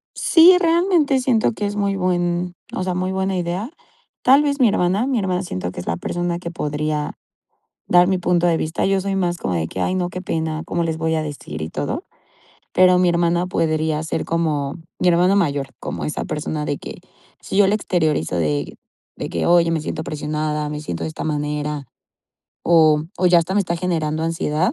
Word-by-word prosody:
Sí, 355 +2 +6
realmente 335 -5 +2
siento 245 -4 +2
que 210 -2 -3
es 205 - -4
muy 200 -1 0
buen, 175 -1 0 0.2
o - - -2
sea, 185 -1 -1
muy 185 +1 -1
buena 190 0 -1
idea, 180 - -3 0.5
tal 275 +3 +6
vez, 285 -1 0
mi 245 -4 +5
hermana 195 +5 +1
mi 260 -4 0
hermana 185 -1 -1
siento 90 - -4
que - - -11
es - - -9
la 85 - -1
persona 175 - -2
que 170 - -5
podría 150 -1 -2 0.8
dar 175 0 +5
mi 190 -1 +2
punto 175 -1 +1
de 165 -1 +2
vista, 160 +1 -1
yo 195 0 +2
soy 195 +1 -2
más 175 -2 0
como 90 - -3
de 80 -1 -1
que: 95 - -7
"Ay, 185 - 0
no, 180 -1 -1
qué 180 +1 -6
pena, 160 -2 -2
cómo 170 0 -1
les 160 -1 -2
voy 160 0 0
a 155 - 0
decir 135 - -7
y 80 - -4
todo", - - -3 0.7
pero 180 0 +5
mi 180 -1 +4
hermana 170 +1 +1
podría 155 -3 0
ser 160 - -2
como, 150 -4 -1 0.2
mi 180 - +3
hermana 180 +3 +4
mayor, 145 -8 +1
como - - -5
esa 150 - -3
persona 150 0 -3
de 145 - -2
que, - - -8 0.5
si 195 - -4
yo 200 -2 +6
la 205 - +3
exteriorizo 155 - 0
de 75 -3 -1 0.4
de - - -4
que: - - -2
"Oye, 170 -1 +4
me 160 -2 0
siento 155 - -4
presionada, 150 0 -3
me 150 0 -4
siento 85 - -5
de 80 - -2
esta - - -6
manera", 150 -1 -2 0.8
o 155 -3 +4
o 180 - +2
ya 175 -1 +6
hasta 170 +3 -1
me 205 - +4
está 175 -2 -1
generando 160 -3 -1
ansiedad 165 - 0
170 Hz, 205 wpm, -21 LUFS, 150-185 Hz, 0.8 s, Sí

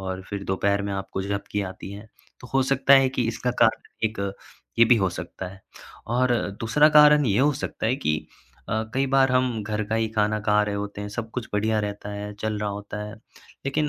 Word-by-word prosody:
और 95 0 -5
फिर 100 -1 -4
दोपहर 100 +1 0
में 100 0 -3
आपको 95 0 -4
झपकी 100 +1 -3
आती 95 - -9
हैं, 105 +2 -10 0.3
तो 125 - -10
हो 135 - +4
सकता 135 +1 +4
है 135 -1 +5
कि 130 -3 -1
इसका 115 +2 -1
कारण 110 0 +2 0.2
एक 110 -2 -1 0.6
ये 115 - +8
भी 120 - +6
हो 95 -3 +2
सकता 95 +1 -7
है। 95 +1 -14 0.4
और 125 +2 +2 0.3
दूसरा 145 +7 +4
कारण 150 -1 +7
ये 105 -2 +2
हो 145 +3 +4
सकता 135 -5 -4
है 125 +4 +1
कि 75 - -1 0.4
अ, - - -2 0.2
कई 135 +1 +2
बार 135 -1 +5
हम 125 -4 +1
घर 105 0 -2
का 110 - 0
ही 110 -1 0
खाना 105 0 +2
खा 105 0 +3
रहे 105 -1 -3
होते 100 0 -5
हैं, 105 - -5
सब 110 +1 -5
कुछ 125 -2 -4
बढ़िया 110 +1 +1
रहता 105 0 -5
है, 105 0 -5
चल 110 0 -3
रहा 105 0 -2
होता 100 +1 -6
है, 105 - -8 0.5
लेकिन 150 +2 0
110 Hz, 220 wpm, -25 LUFS, 100-125 Hz, 0.6 s, ये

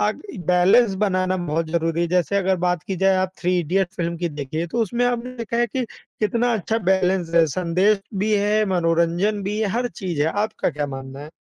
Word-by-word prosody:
आग 210 +1 0 0.3
बैलेंस 190 +5 +4
बनाना 185 -2 +1
बहुत 165 -2 -2
ज़रूरी 165 0 0
है, - - +1
जैसे 180 +2 +1
अगर 190 -1 +2
बात 180 -1 0
की 190 - -3
जाए 190 +1 +3
आप 185 0 0
3 180 0 +1
इडियट्स 185 +4 -1
फ़िल्म 170 -1 -2
की 170 0 -2
देखिए 150 +2 -4
तो 230 +7 0
उसमें 235 +3 0
आपने 245 +1 -2
देखा 235 0 -4
है 240 - +3
कि 250 +3 -2 0.4
कितना 235 +3 +1
अच्छा 220 +2 -1
बैलेंस 185 -3 +1
है, 165 -1 +6
संदेश 185 +6 +1
भी 210 +3 0
है 210 +1 +2
मनोरंजन 175 +4 +1
भी 210 +2 -2
है 215 - +1
हर 245 - 0
चीज़ 175 -6 -3
है। 155 - +2 0.2
आपका 215 -4 -2
क्या 150 -1 -3
मानना 135 0 -7
है? 150 +2 -9
185 Hz, 210 wpm, -22 LUFS, 170-210 Hz, 0.4 s, है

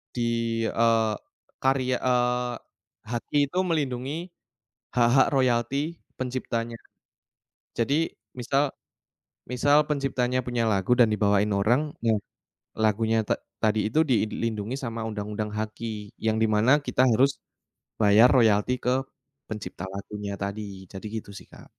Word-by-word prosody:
Di, 120 - -2 0.4
eee, 115 -1 +2 0.5
karya 130 -1 +2
eee, 125 0 +1 0.6
HKI 120 +4 -2 0.2
tuh 185 - +2
melindungi, 135 -4 -1 0.8
hak-hak 120 +2 +5
royalti 135 +5 +1 0.2
penciptanya. 120 -2 -3 1.0
Jadi 120 +5 +1 0.4
misal, 135 +4 +1 0.9
misal 145 +4 +4
penciptanya 130 -3 0
punya 120 -1 -1
lagu 100 -1 0
dan 120 - +7
dibawain 105 0 +2
orang, 120 +10 +1
ya 115 - +3 0.7
lagunya 110 +1 +2
ta - - +3 0.3
tadi 110 0 +2
itu 135 - +1
dilindungi 110 -1 -1
sama 115 -2 -4
undang-undang 105 0 -4
HKI. 110 -1 -5
Yang 110 0 +2
di - - +4
mana 110 +5 +4 0.2
kita - - +2
harus, 130 +5 +4 0.7
bayar 105 +4 +7
royalti 110 0 +4
ke 125 - +3 0.6
pencipta 105 -4 -6
lagunya 100 +1 -6
tadi, 100 +2 -3 0.3
jadi 95 - -8 0.2
gitu 110 - -8
sih - - -12
Kak. - - -14
115 Hz, 120 wpm, -26 LUFS, 110-130 Hz, 1.0 s, dan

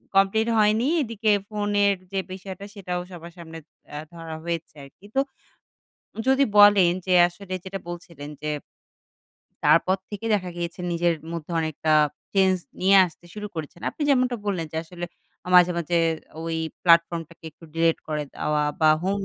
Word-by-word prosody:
Complete 195 +3 +3
হয়নি। 215 +2 +3 0.2
এদিকে 225 -4 -1 0.2
ফোনের 205 -1 +1 0.2
যে 195 - -1
বিষয়টা 190 +1 -8
সেটাও 180 -3 -3
সবার 170 -1 -10
সামনে 165 -1 -9 0.4
আ - - -4 0.2
ধরা 165 -1 -7
হয়েছে 170 -2 -4
আরকি। 140 +8 -16
তো - - +4 1.1
যদি 265 +1 +5 0.2
বলেন 205 -4 +7
যে, 185 - -2 0.2
আসলে 185 +2 -9
যেটা 195 +1 -6
বলছিলেন 170 -4 -8
যে 150 - -3 1.2
তারপর 185 +3 +4
থেকে 210 +2 -5
দেখা 185 -3 -2
গিয়েছে 175 +2 -5
নিজের 170 0 +2 0.2
মধ্যে 170 -1 -6
অনেকটা 155 0 -1 0.4
চেঞ্জ 190 -1 +4 0.2
নিয়ে 195 +2 +5
আসতে 175 +1 -15
শুরু 210 0 -5
করেছেন। 160 +1 -7
আপনি - - -6
যেমনটা 255 -2 +2
বললেন 180 -5 -1
যে, - - -5
আসলে 175 +1 -7 0.4
আ - - -6
মাঝে, 180 0 +7
মাঝে 170 +1 -1 0.5
ওই 165 0 -2 0.3
প্লাটফর্মটাকে 170 -1 +2
একটু 160 - -18
ডিলিট 165 0 +2
করে 150 -1 -2
দেওয়া 150 0 0 0.2
বা 155 - +5
home 195 +2 -1
180 Hz, 155 wpm, -24 LUFS, 165-200 Hz, 1.2 s, বলেন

